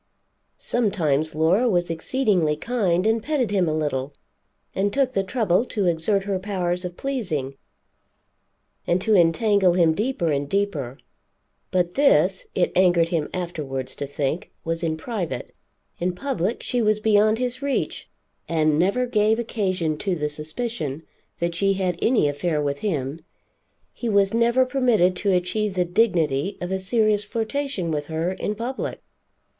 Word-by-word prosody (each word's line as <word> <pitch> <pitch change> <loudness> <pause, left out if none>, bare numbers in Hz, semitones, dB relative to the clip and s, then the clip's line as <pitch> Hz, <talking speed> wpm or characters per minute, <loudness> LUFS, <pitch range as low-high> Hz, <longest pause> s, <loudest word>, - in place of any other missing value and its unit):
Sometimes 160 - 0
Laura 180 +10 +3
was 175 -4 +1
exceedingly 180 - +1
kind 190 -2 0
and 225 +1 +2
petted 265 -6 -1
him 185 -5 +2
a - - 0
little, 145 -2 -2 0.6
and 200 +1 0
took 265 +1 +1
the 195 - +1
trouble 205 -2 +1
to 205 -5 -2
exert 175 +4 +1
her 195 -1 -1
powers 180 -2 -2
of 180 -1 -6
pleasing, 180 - -3 1.3
and 175 - +2
to 215 +4 +1
entangle 185 +2 +4
him 170 -3 +4
deeper 205 -4 -1
and 140 0 -1
deeper. 155 -11 -1 0.7
But 180 -1 0
this, 190 - +3
it 180 - +2
angered 175 -2 +4
him 160 -4 -1
afterwards 150 -7 -4
to 140 - -4
think, 145 +6 -2 0.2
was 165 0 -2
in 160 -2 -1
private; 170 - -4 0.5
in 180 +1 -1
public 235 -3 -2
she 245 - 0
was 215 -1 +2
beyond 215 0 +3
his 250 +2 -3
reach, 280 -1 -2 0.4
and 155 -2 +2
never 200 +8 +2
gave 220 -2 +2
occasion 185 -9 -1
to 195 -3 -1
the 150 -2 -2
suspicion 155 - -4 0.3
that 170 0 -1
she 195 +3 +2
had 185 -3 -1
any 230 - +3
affair 150 +2 -1
with 140 -1 -1
him. 155 -6 -2 0.7
He 240 - -4
was 200 -1 +3
never 235 +3 +3
permitted 245 -9 +2
to 200 +1 +1
achieve 190 +3 0
the 180 -1 +2
dignity 175 -4 +1
of 180 +1 -4
a 190 - 0
serious 210 +1 +2
flirtation 225 - -2
with 145 -1 -2
her 160 +2 -1
in 205 +2 -3
public. 240 +5 -4
185 Hz, 150 wpm, -23 LUFS, 160-220 Hz, 1.3 s, entangle